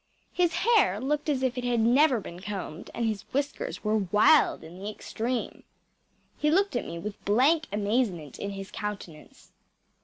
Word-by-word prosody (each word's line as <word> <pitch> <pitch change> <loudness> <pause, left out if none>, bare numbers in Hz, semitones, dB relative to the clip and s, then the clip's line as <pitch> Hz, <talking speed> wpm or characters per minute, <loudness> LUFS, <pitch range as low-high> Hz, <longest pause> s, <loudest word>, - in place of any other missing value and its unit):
His 350 -2 +2
hair 410 - +3
looked 295 +4 -1
as 265 -3 0
if 255 -1 0
it - - -5
had 245 -1 +1
never 250 +3 +4
been 175 -3 -9
combed, 190 -5 -6
and 235 - -2
his 215 -3 -1
whiskers 285 +2 -3
were 215 0 +2
wild 210 - +4
in 170 +3 -11
the 200 +2 -4
extreme. 230 +3 -4 0.8
He 300 - +2
looked 390 +3 +2
at 240 - -2
me 170 - -6
with 200 +4 -7
blank 280 +10 +3
amazement 205 - -1
in 200 - -3
his 195 0 -7
countenance. 200 -7 -8
225 Hz, 165 wpm, -27 LUFS, 200-280 Hz, 0.8 s, never